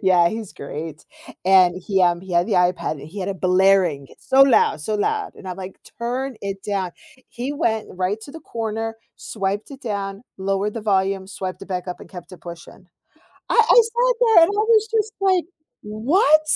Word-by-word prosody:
Yeah, 180 -2 +5
he's 220 -1 -6
great, 150 +2 -7 0.4
and 185 -2 +5
he 190 0 +1
um, 175 -1 +3
he 190 -1 -9
had 175 +2 +3
the 220 - -2
iPad, 180 -2 +2
and 145 0 -9
he 200 +5 -9
had 185 - -3
it 190 -5 -7
blaring, 185 -6 +3
so 270 +1 +4
loud 235 - +4
so 215 +8 -2
loud, 420 - -1
and 190 - -10
I'm 180 - -5
like, 190 0 -8 0.2
"Turn 250 +2 -3
it 195 -1 -5
down." 195 -3 -2 0.4
He 255 +4 -4
went 220 -8 -1
right 185 +4 -2
to 280 - -10
the 325 - -9
corner, 225 -3 -4 0.2
swiped 200 +3 -4
it 275 -1 -10
down, 200 -3 -4
lowered 195 +2 -1
the 230 - -4
volume, 195 -2 0
swiped 190 0 -6
it 195 - -10
back 180 -1 -4
up, 180 - -6
and - - -13
kept 180 -1 -11
it 175 - -12
pushing. 170 +2 -11 0.6
I - - +1
I - - +1 0.2
sat 475 +2 +1
there, 425 -7 +7
and 330 - +3
I 410 - -1
was 440 -1 +4
just 440 -1 0
like, 375 -3 +3 0.4
"What?" 280 - +3
195 Hz, 200 wpm, -21 LUFS, 185-250 Hz, 0.6 s, there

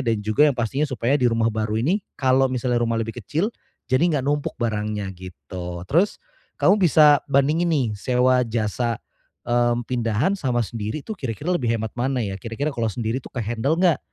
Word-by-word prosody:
dan 115 -2 +1
juga 125 +8 +4
yang 135 - -1
pastinya 125 +6 0
supaya 130 +1 +1
di 125 - +4
rumah 115 0 +1
baru 110 0 -1
ini 180 - +1 0.2
kalau 130 0 +3
misalnya 125 -1 0
rumah 115 -1 0
lebih 115 +2 -4
kecil, 160 - -1 0.4
jadi 130 - +3 0.2
nggak 135 - -1
numpuk 145 0 -1
barangnya 105 -3 -2
gitu. 90 0 -8
Terus 175 - +2 0.4
kamu 205 +2 +4
bisa 150 -3 +6
bandingin 150 +5 +2
nih 140 -6 +2
sewa 125 +2 +3
jasa, 115 +1 -1 0.5
mmm, 120 0 +1
pindahan 120 - 0
sama 125 -7 0
sendiri 110 +6 -4
tuh 220 - -5
kira-kira 130 - -3
lebih 125 -8 -1
hemat 110 0 -4
mana 130 +1 0
ya? 95 -1 -4
Kira-kira 120 +7 -3
kalau 115 -1 0
sendiri 115 +4 -2
tuh - - -10
ke-handle 120 +6 -1
nggak? 175 -4 +4
120 Hz, 180 wpm, -23 LUFS, 110-140 Hz, 0.5 s, bisa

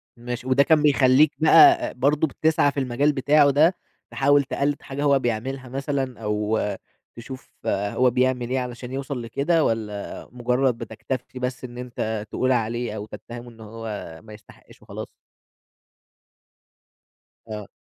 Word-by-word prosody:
ماشي، 120 +1 -6
وده 130 +2 +4
كان 155 +1 +4
بيخلّيك 140 0 +5
بقى 345 - +6
برضه 145 +5 +1
بتسعى 155 0 +2
في 140 - -3
المجال 135 +3 +1
بتاعه 145 +2 +4
ده 155 +6 +4 0.4
تحاول 140 +1 +3
تقلّد 140 +1 -2
حاجة 140 +1 -5
هو 140 -2 +4
بيعملها 130 +2 -3
مثلًا 135 -1 -3
أو 105 +1 -1 0.6
تشوف 130 +3 -10 0.2
هو 105 +6 +1
بيعمل 125 0 0
إيه 130 - 0
علشان 125 0 -6
يوصل 135 -1 -4
لكده 140 +8 +1
والّا 105 -4 -3
مجرّد 125 0 0
بتكتفي 120 +3 -6
بس 125 0 -4
إن 120 -1 -8
أنت 110 -3 -4
تقول 130 - 0
عليه 120 -1 -1
أو 105 -1 -5
تتّهمه 120 +2 -10
إن 115 - -17
هو 115 +1 -9 0.4
ما 110 - -12
يستحقش 105 0 -17
وخلاص؟ - - -8 2.4
آه. 105 -2 -6
130 Hz, 140 wpm, -23 LUFS, 115-140 Hz, 2.4 s, بقى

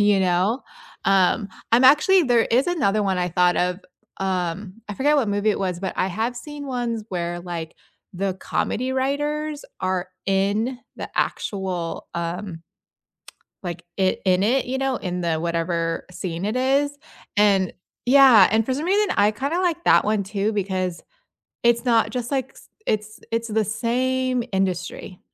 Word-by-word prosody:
you 205 -1 +4
know, 185 +7 +1 0.4
um, 195 +2 +3 0.2
I'm 240 +3 +5
Actually, 310 +8 +6
there 240 -3 +4
is 250 +4 +3
another 215 - +1
one 190 -2 0
I 180 0 0
thought 180 +1 +3
of, 180 +1 0 0.4
um, 185 0 -2
I 210 - -4
forget 290 +6 +2
what 260 -7 +2
movie 205 +1 +1
it - - -1
was, 185 -3 -2
but 190 - -2
I - - +1
have 225 +6 -2
seen 290 +3 -8
ones 240 -4 -2
where 175 -1 -3
like, 170 -2 -6 0.4
the 190 +1 -1
comedy 255 +6 -2
writers 295 +3 -1 0.2
are 185 -1 -1 0.2
in 200 +6 +1 0.2
the - - -6
actual, 185 -4 -2
um 170 0 -4 1.0
like, 175 -1 -5
it 190 -1 +1
in 185 0 +3
it, 250 +5 +2
you 260 +2 -2
know, 270 -1 0
in 180 -1 -4
the 170 -2 0
whatever 165 0 -1
scene 175 0 -4
it 215 +3 -1
is, 275 +3 +1 0.4
and 200 -3 +3 0.3
yeah, 255 -6 +8
and 220 +1 +3
for 260 - 0
some 290 +5 -3
reason, 405 +2 +2
I 205 +1 +5
kind 270 +8 -3
of 355 - +1
like 345 -2 0
that - - +5
one 210 -1 +1
too, 200 +2 -1
because 185 -3 -2 0.6
it's 235 +1 +3
not 230 -2 +3
just 245 0 -4
like, 265 -1 -2
s - - -17 0.2
it's 215 0 -2
it's 230 0 -1
the 220 0 +1
same 250 +3 0
industry. 185 -1 -2
210 Hz, 165 wpm, -23 LUFS, 185-255 Hz, 1.0 s, yeah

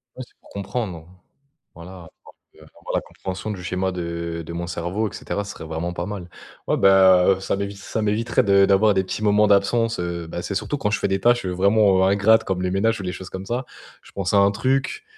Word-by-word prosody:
Ouais 130 - -7
c'est - - -29
pour - - -21
comprendre, 100 -4 -5 0.7
voilà 85 +1 -11 0.2
parce - - -17 0.2
que, - - -21
enfin - - -20
voilà, - - -1
la - - -1
compréhension 95 +3 -6
du 95 -3 -7
schéma 95 +1 -2
de 85 -1 -4
de 85 - -7
mon 85 +1 -4
cerveau 90 +5 -2
et - - -16
cetera, 100 - -4
ce 100 - -7
serait - - -10
vraiment 80 +2 -4
pas 85 0 -4
mal. 95 -3 -7 0.4
Ouais - - +1
ben, 95 -2 +6
heu, - - -10
ça 95 - -2
m'évite 100 0 -4
ça 100 +2 -4
m'éviterait 115 +4 +1
de 100 -2 +5
d'avoir 100 +2 +4
des 95 - +2
petits 95 +3 -5
moments 105 0 +4
d'absence, 115 +3 +2
heu, 85 -1 -4
bah 85 - -5
c'est 100 +2 -4
surtout 145 - -2
quand 110 -7 -1
je 105 - 0
fais - - 0
des 95 0 0
tâches, 120 0 +3
heu, 90 - -2
vraiment, 100 +1 +3
heu, - - +3
ingrates 110 +3 +4
comme 95 -1 -2
les 90 - -1
ménages 110 +4 +1
ou - - -6
les 90 - -3
choses 95 0 -9
comme 95 +1 -7
ça. 120 +5 -3 0.4
Je - - -18
pense 100 -1 -3
à 100 - +5
un 100 0 +5
truc 135 - -1
95 Hz, 250 wpm, -22 LUFS, 90-105 Hz, 0.7 s, ben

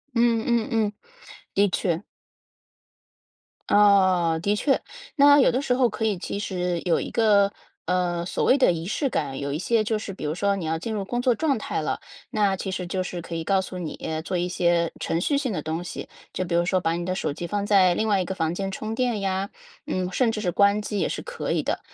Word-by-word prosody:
嗯 230 -1 +3
嗯 235 -2 +1
嗯， 215 -2 +1 0.6
的 200 +1 +4
确。 175 -1 -1 1.7
哦， 190 -5 +4
的 205 +1 +2
确， 270 +4 +2 0.3
那 285 -1 +7
有 265 - +5
的 255 +3 0
时 250 - +1
候 250 -1 +3
可 225 - -5
以 210 -4 +1
其 200 - -5
实 180 -4 -2
有 175 -3 +2
一 - - -4
个， 205 -3 +4 0.4
呃， 175 -1 0
所 - - -2
谓 265 - +5
的 255 -10 +4
仪 165 0 -5
式 245 - -1
感。 135 - -2
有 140 0 -3
一 - - -1
些 215 +6 +1
就 220 0 0
是 210 -2 -6
比 180 - -7
如 150 +1 -1
说 200 +2 +1
你 180 - -4
要 160 +1 -1
进 220 +7 -4
入 200 -2 -3
工 240 +4 -2
作 250 -1 +3
状 285 +1 0
态 215 - -3
了， - - -2 0.3
那 205 -3 +1
其 190 - -4
实 185 -1 -3
就 185 +2 -2
是 180 -1 -5
可 170 - -8
以 165 -1 -4
告 195 +1 +2
诉 185 0 -7
你， 160 -4 -5
呃， 160 0 -2
做 180 +2 -3
一 175 +1 -1
些 170 -2 +1
程 165 - -1
序 285 +8 +1
性 260 -6 -1
的 155 - -2
东 160 +2 -3
西。 175 - -7 0.2
就 185 - -1
比 175 - -4
如 170 0 +3
说 185 +1 +1
把 165 -1 0
你 170 0 -3
的 185 - -1
手 185 - -1
机 170 +4 -5
放 205 +2 -2
在 190 -3 +5
另 220 - 0
外 200 -2 +3
一 - - -2
个 190 - -4
房 160 -2 -1
间 195 +2 -3
充 215 +3 -4
电 240 -3 0
呀， 195 0 -1 0.4
呃， 185 -1 -2
甚 240 +4 +2
至 215 - -3
是 180 -4 0
关 200 +3 +3
机 210 -1 -3
也 - - +1
是 - - -4
可 - - -5
以 - - 0
的。 - - -1
190 Hz, 260 characters per minute, -25 LUFS, 175-215 Hz, 1.7 s, 那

